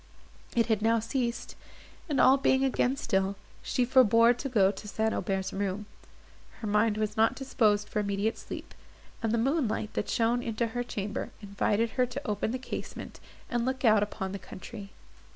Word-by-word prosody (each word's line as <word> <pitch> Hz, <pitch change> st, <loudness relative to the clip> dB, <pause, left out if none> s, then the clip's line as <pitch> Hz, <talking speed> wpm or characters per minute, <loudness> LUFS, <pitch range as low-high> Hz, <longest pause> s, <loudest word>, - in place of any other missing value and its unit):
It 230 Hz, -1 st, +4 dB
had 220 Hz, -3 st, +1 dB
now 225 Hz, +1 st, +3 dB
ceased, 235 Hz, +1 st, -3 dB, 0.5 s
and, 285 Hz, -3 st, +1 dB
all 260 Hz, -, +7 dB
being 265 Hz, -1 st, +2 dB
again 265 Hz, -1 st, +1 dB
still, 195 Hz, -4 st, 0 dB, 0.3 s
she 250 Hz, -, 0 dB
forbore 235 Hz, -2 st, +6 dB
to 275 Hz, +3 st, -5 dB
go 200 Hz, -6 st, +4 dB
to 210 Hz, +1 st, -10 dB
St. 220 Hz, +1 st, 0 dB
Aubert's 190 Hz, -2 st, -2 dB
room. 200 Hz, +1 st, -2 dB, 0.7 s
Her -, -, -6 dB
mind 210 Hz, +1 st, +2 dB
was 215 Hz, -1 st, -1 dB
not 225 Hz, +1 st, +3 dB
disposed 215 Hz, -6 st, +1 dB
for -, -, -2 dB
immediate 200 Hz, +2 st, -1 dB
sleep, -, -, -8 dB, 0.5 s
and 225 Hz, -1 st, 0 dB
the 235 Hz, -, +2 dB
moonlight, 235 Hz, -4 st, 0 dB
that 210 Hz, -, -2 dB
shone 235 Hz, +1 st, +2 dB
into 230 Hz, 0 st, -1 dB
her 245 Hz, -, -1 dB
chamber, 210 Hz, -4 st, -4 dB
invited 205 Hz, +3 st, 0 dB
her 250 Hz, -1 st, +1 dB
to 260 Hz, +4 st, -6 dB
open 210 Hz, 0 st, -1 dB
the 250 Hz, -, -2 dB
casement, 255 Hz, -, -7 dB, 0.3 s
and 240 Hz, -1 st, -1 dB
look 260 Hz, +1 st, -1 dB
out 215 Hz, -2 st, +6 dB
upon 200 Hz, -2 st, -3 dB
the 200 Hz, -, -5 dB
country. 195 Hz, +2 st, -9 dB
225 Hz, 175 wpm, -29 LUFS, 205-245 Hz, 0.7 s, all